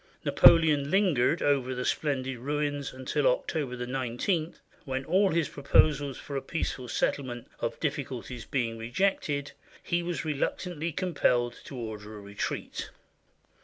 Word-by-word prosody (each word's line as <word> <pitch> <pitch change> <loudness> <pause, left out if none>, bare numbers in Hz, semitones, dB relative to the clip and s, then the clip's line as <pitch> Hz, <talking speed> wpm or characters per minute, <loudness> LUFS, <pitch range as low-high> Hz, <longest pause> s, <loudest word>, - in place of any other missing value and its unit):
Napoleon 155 -4 +6
lingered 175 -6 +3
over 135 -3 +2
the 125 - -3
splendid 135 -4 -1
ruins 145 +1 -2
until 130 0 -2
Oct. 145 - 0
19, 135 - -1 0.3
when 135 0 -3
all 195 +2 +4
his 165 -3 +1
proposals 140 -1 +3
for 140 - -7
a 135 - 0
peaceful 135 -3 -3
settlement 120 0 -1
of 115 - -3
difficulties 130 -5 -3
being 115 -4 -1
rejected, 145 +2 0 0.3
he 170 0 0
was 170 -1 -3
reluctantly 160 +2 -2
compelled 125 -9 +1
to - - -8
order 110 -2 -6
a - - -8
retreat. 100 0 -4
140 Hz, 130 wpm, -29 LUFS, 125-160 Hz, 0.3 s, Napoleon